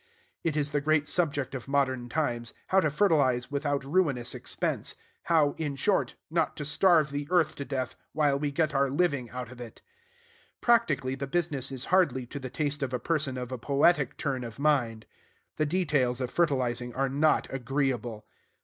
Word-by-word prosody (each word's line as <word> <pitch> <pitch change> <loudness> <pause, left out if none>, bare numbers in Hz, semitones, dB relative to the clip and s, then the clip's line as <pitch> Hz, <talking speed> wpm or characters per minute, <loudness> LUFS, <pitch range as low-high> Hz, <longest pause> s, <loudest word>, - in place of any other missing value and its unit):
It 155 -2 0
is 145 -1 0
the 145 0 0
great 155 0 +2
subject 145 -7 -1
of 130 -2 -6
modern 130 -3 0
times, 120 -6 -2
how 190 - +5
to 155 - +2
fertilize 140 -8 +2
without 145 -1 -1
ruinous 140 -6 +1
expense; - - -3 0.3
how, 155 -4 +3
in 145 -3 -2
short, 190 +8 +1 0.2
not 165 0 0
to 150 - -4
starve 155 0 +4
the 145 0 -3
earth 175 -4 +3
to 140 - -4
death 130 -3 -3 0.2
while 145 -1 +2
we 145 0 0
get 155 +1 0
our 140 -1 +2
living 140 -5 0
out 125 -1 -6
of 125 -1 -11
it. 115 -2 -10 0.8
Practically, 155 - +2
the 135 +1 -4
business 145 -4 -1
is 130 -2 -4
hardly 145 -9 +3
to 140 +4 -7
the 130 -1 -6
taste 145 +1 -2
of 130 -2 -2
a - - -2
person 150 -3 -1
of 125 0 -5
a 130 - -4
poetic 140 +1 +2
turn 135 -4 -2
of 115 -2 -8
mind. 130 -7 +1 0.5
The 155 - +1
details 145 -7 +1
of 125 -2 -3
fertilizing 125 -7 0
are 135 +1 +1
not 145 +4 +2
agreeable. 125 -4 -2
140 Hz, 180 wpm, -28 LUFS, 130-155 Hz, 0.8 s, how